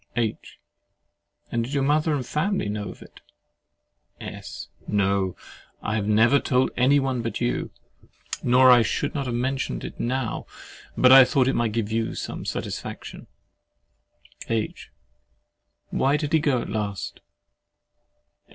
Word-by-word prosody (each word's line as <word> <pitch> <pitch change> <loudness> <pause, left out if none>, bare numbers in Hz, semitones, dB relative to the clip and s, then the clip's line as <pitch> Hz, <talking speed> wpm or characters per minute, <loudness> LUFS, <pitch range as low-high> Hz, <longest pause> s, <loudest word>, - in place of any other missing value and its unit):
H. 115 -3 -3 0.9
And 115 - 0
did 130 +5 -5
your 140 - +2
mother 150 +2 +2
and 130 -3 -3
family 160 - -1
know 105 -1 -4
of - - -11
it? - - -17 1.0
S. - - -8 0.2
No—I 100 +1 -2
have 105 -2 -1
never 115 +6 +5
told 130 -1 +1
any 135 +4 +4
one 130 -3 -1
but 115 0 -3
you; 120 0 -1 0.7
nor 125 +1 +6
I 120 -1 +7
should - - -1
not 140 -3 -2
have 120 - -2
mentioned 130 +3 -2
it - - -8
now, 125 -1 -2 0.5
but 125 - +6
I 135 0 +11
thought 130 0 +2
it 135 - +2
might 115 -2 0
give 110 -2 -2
you 115 0 -1
some - - -5
satisfaction. - - -6 1.2
H. 115 -2 -2 1.0
Why 140 +2 +2
did 150 +1 -3
he 160 - +5
go 140 -5 +1
at - - -8
last? 105 -3 -4
125 Hz, 140 wpm, -24 LUFS, 110-135 Hz, 1.2 s, I